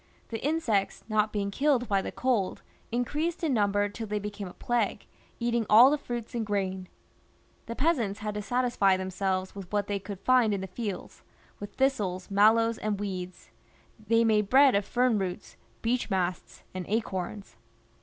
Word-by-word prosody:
The 225 Hz, -1 st, -5 dB
insects 255 Hz, -10 st, 0 dB
not 215 Hz, 0 st, +2 dB
being 200 Hz, -1 st, -2 dB
killed 270 Hz, 0 st, +1 dB
by 195 Hz, -2 st, +2 dB
the -, -, -5 dB
cold 240 Hz, -7 st, -1 dB, 0.3 s
increased 300 Hz, +9 st, -2 dB
in 305 Hz, -4 st, +1 dB
number 205 Hz, -2 st, +2 dB
till 220 Hz, +2 st, -7 dB
they 210 Hz, 0 st, -2 dB
became 205 Hz, -1 st, -5 dB
a 180 Hz, -, -10 dB
plague, 240 Hz, -1 st, -1 dB, 0.3 s
eating 235 Hz, -1 st, +1 dB
all 240 Hz, +6 st, +8 dB
tlie 300 Hz, -, +1 dB
fruits 240 Hz, -4 st, -6 dB
and 235 Hz, -2 st, -1 dB
grain. 190 Hz, -3 st, -2 dB, 0.8 s
The 230 Hz, -, -5 dB
peasants 250 Hz, -10 st, +1 dB
had 210 Hz, 0 st, -3 dB
to 210 Hz, -, -3 dB
satisfy 240 Hz, -4 st, +2 dB
themselves 185 Hz, 0 st, -2 dB
with 195 Hz, -3 st, -9 dB
what 205 Hz, -1 st, 0 dB
they 200 Hz, -1 st, -2 dB
could 195 Hz, -1 st, -8 dB
find 245 Hz, -4 st, +4 dB
in 195 Hz, -, -4 dB
the -, -, -3 dB
fields, 200 Hz, +1 st, -6 dB, 0.4 s
with 205 Hz, 0 st, -8 dB
thistles, 205 Hz, -9 st, 0 dB
mallows, 225 Hz, +3 st, +4 dB
and 210 Hz, -2 st, -2 dB
weeds; 185 Hz, -3 st, -6 dB, 0.6 s
they 230 Hz, +1 st, +4 dB
made 210 Hz, -3 st, +2 dB
bread 270 Hz, 0 st, +6 dB
of 200 Hz, 0 st, +1 dB
fern 245 Hz, -3 st, +2 dB
roots, 180 Hz, -12 st, -5 dB, 0.3 s
beech 240 Hz, +1 st, 0 dB
masts, 185 Hz, -2 st, -2 dB
and 185 Hz, 0 st, -4 dB
acorns. 195 Hz, -, -3 dB
210 Hz, 170 wpm, -28 LUFS, 195-240 Hz, 0.8 s, all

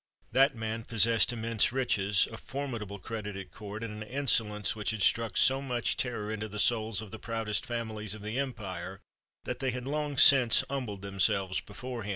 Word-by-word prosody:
That 135 Hz, +3 st, +4 dB
man 110 Hz, 0 st, -4 dB
possessed 115 Hz, +1 st, +3 dB
immense 115 Hz, -2 st, +1 dB
riches, 105 Hz, -6 st, +1 dB
a -, -, -7 dB
formidable 115 Hz, -8 st, -5 dB
credit 105 Hz, 0 st, -6 dB
at 95 Hz, -2 st, -8 dB
court, 105 Hz, +1 st, -8 dB
and 105 Hz, -1 st, -6 dB
an 110 Hz, -, -8 dB
insolence 110 Hz, -7 st, +2 dB
which 105 Hz, -1 st, -2 dB
had 110 Hz, -2 st, -1 dB
struck 115 Hz, -5 st, +3 dB
so 135 Hz, +1 st, +4 dB
much 125 Hz, -4 st, -1 dB
terror 115 Hz, -5 st, -2 dB
into 110 Hz, 0 st, -4 dB
the 105 Hz, 0 st, -8 dB
souls 110 Hz, -1 st, +1 dB
of 105 Hz, -, -12 dB
the 110 Hz, -, -8 dB
proudest 115 Hz, -2 st, -2 dB
families 110 Hz, -3 st, -4 dB
of 105 Hz, -, -11 dB
the 110 Hz, +5 st, -3 dB
empire, 95 Hz, -8 st, -5 dB, 0.4 s
that 125 Hz, -, -4 dB
they 135 Hz, -, -1 dB
had 125 Hz, 0 st, -4 dB
long 145 Hz, 0 st, -2 dB
since 125 Hz, -4 st, +7 dB
humbled 120 Hz, -8 st, -4 dB
themselves 95 Hz, -1 st, +1 dB
before 120 Hz, +3 st, -7 dB
him. 100 Hz, -, -6 dB
110 Hz, 190 wpm, -30 LUFS, 105-125 Hz, 0.4 s, since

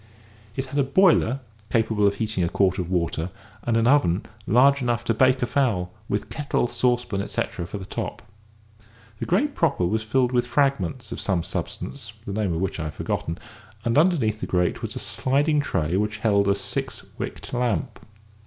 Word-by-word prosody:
It 135 Hz, -, -2 dB
had 140 Hz, +2 st, -2 dB
a -, -, +5 dB
boiler 135 Hz, -4 st, +4 dB, 0.3 s
capable 110 Hz, -3 st, +3 dB
of 100 Hz, -, +1 dB
heating 105 Hz, -3 st, -1 dB
a 85 Hz, -, +1 dB
quart 95 Hz, 0 st, +2 dB
of 90 Hz, -1 st, -3 dB
water, 85 Hz, -1 st, -1 dB, 0.3 s
and 115 Hz, -1 st, +1 dB
an 115 Hz, -, +3 dB
oven 120 Hz, -9 st, +3 dB, 0.2 s
large 140 Hz, +5 st, +5 dB
enough 120 Hz, -1 st, 0 dB
to 115 Hz, -, +1 dB
bake 130 Hz, +2 st, +3 dB
a -, -, +4 dB
fowl, 110 Hz, -10 st, 0 dB, 0.2 s
with 105 Hz, 0 st, -1 dB
kettle, 140 Hz, 0 st, 0 dB
saucepan, 120 Hz, -5 st, 0 dB
etcetera, 85 Hz, -3 st, -3 dB
for 105 Hz, -, -5 dB
the 95 Hz, -, -7 dB
top. -, -, -5 dB, 1.0 s
The -, -, -3 dB
grate 280 Hz, +11 st, +2 dB
proper 140 Hz, -, +1 dB
was 110 Hz, +5 st, 0 dB
filled 125 Hz, +3 st, +1 dB
with 120 Hz, -1 st, +1 dB
fragments 130 Hz, -, 0 dB
of -, -, -4 dB
some 90 Hz, -3 st, 0 dB
substance, 115 Hz, +4 st, -5 dB
the 100 Hz, -, -4 dB
name 105 Hz, -3 st, 0 dB
of 85 Hz, +1 st, -1 dB
which 95 Hz, 0 st, -2 dB
I 80 Hz, -, -2 dB
have 75 Hz, -, -5 dB
forgotten, 85 Hz, +2 st, -2 dB, 0.5 s
and 115 Hz, -, +1 dB
underneath 145 Hz, -, +3 dB
the -, -, -2 dB
grate 90 Hz, -1 st, +1 dB
was -, -, -4 dB
a -, -, -3 dB
sliding 145 Hz, +3 st, +1 dB
tray 80 Hz, -, -1 dB
which 105 Hz, +1 st, -1 dB
held 100 Hz, -2 st, +2 dB
a 100 Hz, -, +4 dB
six 100 Hz, -, -4 dB
wicked -, -, -6 dB
lamp. 120 Hz, -8 st, -1 dB
110 Hz, 190 wpm, -24 LUFS, 95-130 Hz, 1.0 s, a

